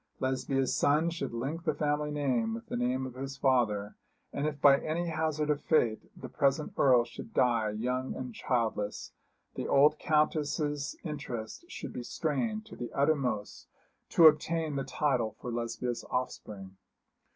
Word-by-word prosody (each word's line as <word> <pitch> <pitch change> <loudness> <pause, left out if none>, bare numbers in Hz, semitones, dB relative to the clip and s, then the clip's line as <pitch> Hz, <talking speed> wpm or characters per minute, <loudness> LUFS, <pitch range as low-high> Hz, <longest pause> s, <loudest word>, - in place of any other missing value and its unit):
Lesbia's 130 0 0
son 155 +4 +3
should 170 - -4
link 135 +8 -4
the 155 -4 0
family 150 0 0
name 130 -7 0
with 115 - -8
the - - -5
name 125 +2 0
of 130 - -7
his 135 +1 -6
father; 115 -7 +1 0.4
and 145 +2 -1
if 145 -1 -4
by 140 -1 +7
any 170 +2 -2
hazard 155 -1 0
of 145 - -1
fate 120 -9 +1
the - - -6
present 140 +2 0
Earl 125 -3 +5
should 115 -1 -10
die 115 -3 +3
young 125 +5 -2
and 125 -2 -6
childless, 110 -4 -2 0.4
the - - -4
old 150 +2 +5
Countess's 150 -1 0
interest 140 - -6
should - - -7
be - - -4
strained 215 - -2
to - - -11
the 120 - -6
uttermost 135 -8 0 0.4
to 165 - +6
obtain 155 0 +4
the 135 - -1
title 130 -4 0
for 125 - -5
Lesbia's 120 +1 -3
offspring. 100 -6 -4
135 Hz, 155 wpm, -30 LUFS, 120-150 Hz, 0.4 s, by